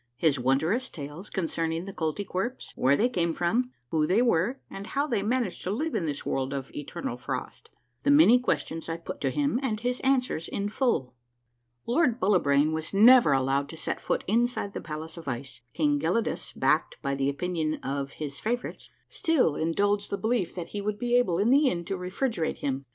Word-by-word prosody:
— 120 - -49
HIS 145 -2 +2
WONDUOUS 155 - +1
TALES 150 +6 -8
CONCERNING 165 -1 -2
THE 195 - -7
KOLTY 160 +4 -2
KWERPS: 210 +9 -4
WHERE 135 +2 +3
THEY 235 - +3
CAME 170 -7 0
FROM, 240 +9 0 0.2
WHQ 155 -1 +2
THEY 195 +7 +3
WERE, 235 +3 +1
AND 195 +1 -8
HOW 280 +1 0
THEY 235 -9 0
MANAGED 225 -2 -1
TO - - -3
LIVE 295 +11 -1
IN 165 - -1
THIS 145 -1 -3
WORLD 135 +1 -1
OF 135 -1 -5
ETER 165 +4 -7
NAL 120 - -2
FROST. - - -6 0.2
— 120 0 -47
THE - - +2
MANY 285 -4 +7
QUESTIONS 165 -9 -2
I 165 - -2
PUT 170 - -8
TO - - +1
HIM, 285 -4 0
AND 225 -5 -2
HIS 245 +1 -1
ANSWERS 255 -11 +1
IN 200 +1 -2
FULL. 210 - 0 0.7
Lold 250 -1 +2
Bullibrain 155 -6 +3
was 160 +4 -3
never 235 - +7
allowed 135 +1 +1
to 160 - -9
set - - -3
foot - - -1
inside 230 -1 0
the - - -5
palace 155 +2 -7
of 165 - -10
ice. 130 0 -5
King 145 -2 +2
Gelidus, 180 +10 -1
backed - - +1
by 140 -1 0
the 135 0 0
opinion 160 +1 -1
of 140 0 -3
Ids 145 -2 -4
favorites, 240 +3 -3 0.2
still 280 - +2
indulged 200 +5 0
the 200 - -2
belief 220 -5 -1
that 175 -2 -5
he 205 - -4
would 210 0 -2
be 245 +2 0
able 215 -9 +3
in 210 +6 +3
the 280 0 +5
end 170 -4 -3
to 195 - -2
refrigerate 185 +1 -2
him. 135 -1 -3
180 Hz, 205 wpm, -27 LUFS, 150-235 Hz, 0.7 s, MANY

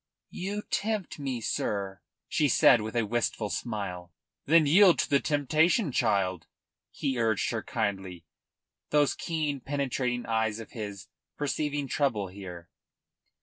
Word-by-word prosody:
"You 205 +3 -4
tempt 210 -7 -2
me, 130 -4 -3
sir," 100 -4 -2 0.3
she 150 -2 +2
said, 120 -1 +6
with 110 +2 -5
a 115 -2 +2
wistful 110 -1 -1
smile. 95 -7 -4 0.4
"Then 160 +1 +6
yield 180 +4 +6
to - - 0
the 140 - +5
temptation, 155 - +2
child," 95 -8 0 0.4
he 130 -3 -2
urged 110 -3 +1
her 115 -2 -2
kindly, 95 -7 -3 0.6
those 145 -3 +3
keen, 155 -4 -2
penetrating 130 -3 -2
eyes 110 -1 0
of 115 - -10
his 100 -4 -6 0.3
perceiving 145 0 -1
trouble 120 -10 0
here. 90 -3 -10
120 Hz, 130 wpm, -28 LUFS, 100-145 Hz, 0.6 s, said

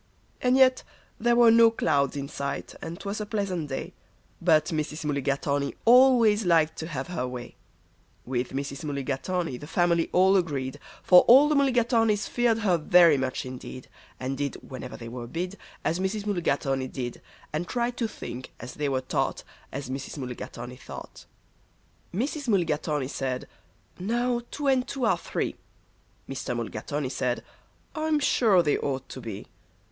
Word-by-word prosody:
And 250 +1 +3
yet 260 -1 +5 0.4
there 240 +1 +3
were 235 -1 +7
no 230 0 +7
clouds 140 - +1
in 140 0 -3
sight, 140 -1 -4
and 165 +2 -6
'twas 200 +2 -4
a - - -3
pleasant 190 -8 -2
day, 135 - -5 0.5
But 160 -3 +4
Mrs. 155 -1 -3
Mulligatawny 140 0 -1
always 235 -3 +6
liked 165 -3 +3
to 160 - -4
have 140 -2 -5
her 145 -8 -2
way. 125 -1 -7 0.7
With 125 0 -2
Mrs. 140 +1 -4
Mulligatawny 145 +2 -2
the 145 - -10
family 170 0 +2
all 190 +2 +5
agreed, 140 -7 -2 0.2
For 180 -1 +8
all 270 +5 +8
the - - +3
Mulligatawnys 235 -6 +2
feared 240 -2 +2
her 180 -4 +3
very 170 0 +6
much 130 -1 -2
indeed, 130 0 -8 0.3
And 130 +1 -3
did, 140 -1 -2
whenever 130 -1 -7
they 115 - -8
were 120 0 -6
bid, 180 +8 -4 0.3
As 170 - +1
Mrs. 200 +2 -2
Mulligatawny 140 -9 0
did, 125 -2 -5 0.3
And 165 +3 -2
tried 240 0 -1
to 230 - 0
think, 130 - -8
as - - -8
they 145 -1 -2
were 130 -1 0
taught, 130 - -1 0.3
As 135 0 -5
Mrs. 135 +3 -5
Mulligatawny 125 -1 -7
thought. 120 - -10 0.9
Mrs. 275 - -2
Mulligatawny 155 - +1
said, 130 -2 -3 0.5
"Now 240 +5 0
two 295 - -5
and 260 -2 +2
two 270 -2 -2
are 225 - +4
three." - - -3 0.7
Mr. - - -4
Mulligatawny - - -3
said, - - -1 0.5
"I'm 310 -1 +1
sure 220 -9 +4
they 150 - +1
ought 135 -2 -3
to 130 - -8
be." 110 -4 -7
165 Hz, 155 wpm, -27 LUFS, 135-225 Hz, 0.9 s, For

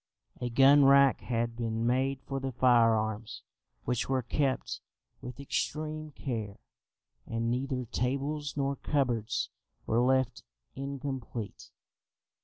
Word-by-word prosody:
A 125 - -1
gun 135 +4 +6
rack 140 0 +6
had 115 -1 -1
been 115 -1 -2
made 130 +2 +1
for 135 -1 -3
the 135 0 -3
firearms, 115 -3 +2 0.4
which 125 0 -1
were 130 -1 +1
kept 135 +2 -1 0.4
with 125 +1 -8
extreme 155 +2 -3
care, 115 -8 -5 0.7
and 115 +1 -1
neither 130 0 -2
tables 140 +5 -2
nor 140 0 0
cupboards 120 -5 0 0.3
were 115 +2 +2
left 130 0 +2 0.3
incomplete. 135 -5 -5
130 Hz, 110 wpm, -30 LUFS, 115-140 Hz, 0.7 s, gun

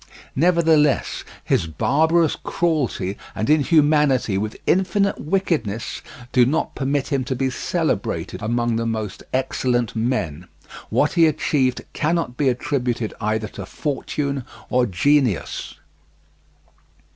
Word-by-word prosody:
Nevertheless, 160 -3 +3 0.2
his 85 - +1
barbarous 160 - +2
cruelty 140 - -1 0.2
and 110 +7 0
inhumanity 150 - +3
with 105 +2 -2
infinite 190 +2 +1
wickedness 150 - -1 0.3
do 125 - +5
not 145 +7 0
permit 140 0 -1
him 135 -3 0
to 130 0 -2
be 130 +1 0
celebrated - - -2
among 120 +1 0
the 115 0 -1
most 110 -3 -3
excellent 125 -3 0
men. 105 - -2 0.4
What 150 - +2
he 165 -2 +5
achieved 135 -4 0
cannot 160 -5 0
be 140 0 +2
attributed 125 -3 -1
either 110 +1 0
to 100 -2 -8
fortune 140 -1 -3 0.3
or 125 -1 +3
genius. 125 - +1
130 Hz, 110 wpm, -22 LUFS, 115-150 Hz, 0.4 s, do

